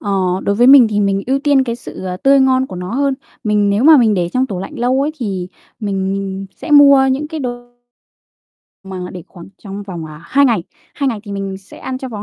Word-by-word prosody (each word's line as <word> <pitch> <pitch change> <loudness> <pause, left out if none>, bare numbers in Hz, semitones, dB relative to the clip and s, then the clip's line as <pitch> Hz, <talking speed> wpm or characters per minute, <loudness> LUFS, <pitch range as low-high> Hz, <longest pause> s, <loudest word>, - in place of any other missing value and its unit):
Ờ, 205 - -4 0.3
đối 200 - 0
với 240 +4 +3
mình 265 -4 +8
thì 210 -1 -1
mình 195 -1 0
ưu 270 +1 +1
tiên 280 -2 +2
cái 235 -1 -3
sự 190 -5 -9 0.2
tươi 275 0 +5
ngon 260 0 +2
của 185 - -9
nó 180 +5 -5
hơn. 275 0 +1 0.3
Mình 210 -1 +2
nếu 210 +6 +1
mà 315 -1 +8
mình 225 -5 +3
để 175 -2 -1
trong 255 +7 0
tủ 195 -6 -5
lạnh 245 +9 -7
lâu 250 +2 +1
ấy 295 - -1
thì 190 -6 -4 0.3
mình 195 -2 -2
mình 195 0 -4
sẽ - - -8
mua 280 -2 +7
những 295 +3 -2
cái 315 -2 -5
đồ 245 -1 -7 1.1
mà 190 -1 -8 0.2
để 180 - -8
khoảng 170 -2 -13 0.2
trong 200 0 -7
vòng, 175 -5 -7
à, 155 0 -11
2 280 +9 +2
ngày, 230 -10 +2 0.3
2 280 - -1
ngày 225 -5 -3
thì 200 - -8
mình 195 -1 -4
sẽ 195 - -15
ăn 255 0 -5
trong 260 -2 -7
vòng 205 - -6
225 Hz, 240 wpm, -16 LUFS, 195-265 Hz, 1.1 s, mình